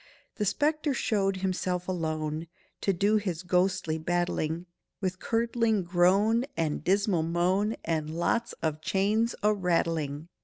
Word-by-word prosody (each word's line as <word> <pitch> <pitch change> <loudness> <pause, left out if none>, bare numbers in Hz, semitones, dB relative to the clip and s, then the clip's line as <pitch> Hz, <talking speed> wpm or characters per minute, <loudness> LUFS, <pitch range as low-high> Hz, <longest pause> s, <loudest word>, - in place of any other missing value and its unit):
The 210 - 0
spectre 300 - +1
showed 195 -4 +1
himself, 185 -1 -2
alone, 155 -2 -2 0.3
To 195 - +2
do 200 +4 +2
his 185 -5 -3
ghostly 180 -2 +1
battling, 175 0 -1 0.3
With 185 -2 -2
curdling 230 -3 +1
groan 195 +7 +3
and 155 -3 -1
dismal 195 -1 +2
moan, 180 +6 +1
And 155 -2 -1
lots 230 +7 0
of 155 -1 -1
chains 210 +5 +1
a 210 0 +4
rattling! 165 -5 -1
185 Hz, 125 wpm, -28 LUFS, 165-210 Hz, 0.3 s, a